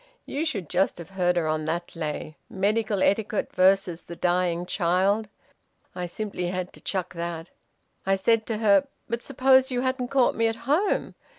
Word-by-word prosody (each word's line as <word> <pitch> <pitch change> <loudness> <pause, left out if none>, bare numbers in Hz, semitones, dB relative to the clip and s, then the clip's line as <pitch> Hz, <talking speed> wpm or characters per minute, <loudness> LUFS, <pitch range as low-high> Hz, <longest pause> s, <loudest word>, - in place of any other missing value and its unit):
You 295 +4 -2
should 200 - -2
just 185 +4 +1
have 175 +2 -10
heard 180 -2 +1
her 170 -2 +1
on 155 0 -1
that 170 +3 -3
lay 155 -1 -4
medical 205 +1 0
etiquette 210 +1 0
versus 185 -2 +3
the 170 - -9
dying 175 0 +1
child. 190 +4 +1 0.7
I 180 0 -4
simply 180 -1 -4
had 185 0 -3
to - - -13
chuck 185 -2 -3
that. 170 -1 -5 0.5
I 195 0 +2
said 220 +3 +2
to 225 - -1
her, 215 +5 +4 0.2
`But 235 0 -2
suppose 265 0 +4
you 250 -1 -1
hadn't 260 -1 -1
caught 265 -1 +3
me 230 0 +2
at 225 - -1
home? 315 +10 +1
195 Hz, 175 wpm, -26 LUFS, 175-230 Hz, 0.7 s, her